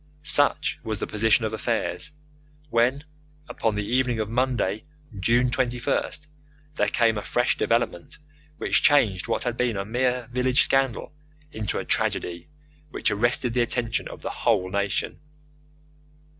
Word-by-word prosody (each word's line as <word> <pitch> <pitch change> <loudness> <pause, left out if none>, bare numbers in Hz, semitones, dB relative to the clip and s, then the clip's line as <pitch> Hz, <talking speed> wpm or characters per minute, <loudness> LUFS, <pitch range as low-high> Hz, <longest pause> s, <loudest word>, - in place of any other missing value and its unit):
Such 145 -1 +4
was 110 -3 -3
the - - -2
position 110 +2 +2
of 110 - -3
affairs 115 +5 -2 0.6
when, 125 +5 +2 0.4
upon 110 -2 -1
the 105 0 -2
evening 125 0 0
of 110 0 -3
Monday, 120 -5 0 0.4
June 120 +5 +2
21st, 125 +4 -1 0.5
there - - +1
came 115 -3 +2
a - - -6
fresh 120 +4 0
development 115 -7 -1 0.4
which - - +1
changed 110 -11 +3
what - - -1
had 120 -1 -2
been 120 -4 0
a 100 - -3
mere 125 +2 -1
village 125 +1 +3
scandal 135 0 0 0.4
into 110 -2 -3
a - - -4
tragedy 85 - -1 0.4
which - - -1
arrested 120 +3 0
the 125 - +2
attention 120 +2 -1
of - - -11
the - - -3
whole 95 -6 0
nation. 100 0 -2
120 Hz, 145 wpm, -25 LUFS, 110-125 Hz, 0.6 s, Such